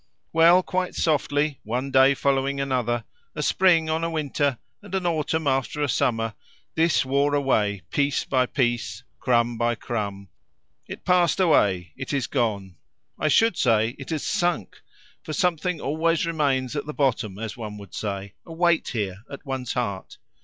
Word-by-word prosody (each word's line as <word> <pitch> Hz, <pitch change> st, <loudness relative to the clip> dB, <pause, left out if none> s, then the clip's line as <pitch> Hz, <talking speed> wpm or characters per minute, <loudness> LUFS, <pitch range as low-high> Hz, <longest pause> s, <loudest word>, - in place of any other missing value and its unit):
Well, 170 Hz, +3 st, +6 dB
quite 185 Hz, 0 st, -2 dB
softly, 145 Hz, -2 st, +1 dB
one 125 Hz, +5 st, -3 dB
day 135 Hz, +1 st, +5 dB
following 140 Hz, 0 st, 0 dB
another, 125 Hz, -4 st, -1 dB, 0.3 s
a 150 Hz, -, -2 dB
spring 170 Hz, -1 st, +3 dB
on 160 Hz, +1 st, -1 dB
a 165 Hz, -, 0 dB
winter, 145 Hz, -4 st, -1 dB, 0.2 s
and 200 Hz, -2 st, -6 dB
an 190 Hz, -2 st, -1 dB
autumn 160 Hz, -1 st, 0 dB
after 135 Hz, +2 st, 0 dB
a -, -, +1 dB
summer, 115 Hz, -3 st, 0 dB, 0.4 s
this 160 Hz, -3 st, +2 dB
wore 140 Hz, +2 st, +2 dB
away, 105 Hz, -, +1 dB
piece 140 Hz, -1 st, +1 dB
by 130 Hz, -2 st, +1 dB
piece, 120 Hz, -8 st, -1 dB, 0.2 s
crumb 120 Hz, -2 st, +1 dB
by 120 Hz, 0 st, +1 dB
crumb; 100 Hz, -5 st, -4 dB, 0.6 s
it -, -, -9 dB
passed 180 Hz, -1 st, +3 dB
away, 95 Hz, -, +2 dB
it -, -, -5 dB
is 135 Hz, -3 st, 0 dB
gone, 100 Hz, -7 st, -2 dB, 0.4 s
I -, -, +1 dB
should 225 Hz, +5 st, +3 dB
say 115 Hz, -3 st, +3 dB
it 135 Hz, -, -8 dB
has 155 Hz, -3 st, -2 dB
sunk; 175 Hz, -, -1 dB, 0.4 s
for 155 Hz, -, -6 dB
something 180 Hz, +1 st, 0 dB
always 160 Hz, +4 st, 0 dB
remains 140 Hz, -5 st, 0 dB
at 145 Hz, 0 st, -3 dB
the 150 Hz, -, -5 dB
bottom 115 Hz, -8 st, 0 dB
as 110 Hz, 0 st, -5 dB
one 105 Hz, -3 st, -7 dB
would 100 Hz, -3 st, -12 dB
say 100 Hz, -1 st, -4 dB
a -, -, -13 dB
weight 170 Hz, 0 st, +2 dB
here, 100 Hz, -5 st, -3 dB
at 140 Hz, -, -9 dB
one's 130 Hz, -3 st, -3 dB
heart. 100 Hz, -7 st, -4 dB
135 Hz, 165 wpm, -24 LUFS, 115-160 Hz, 0.6 s, Well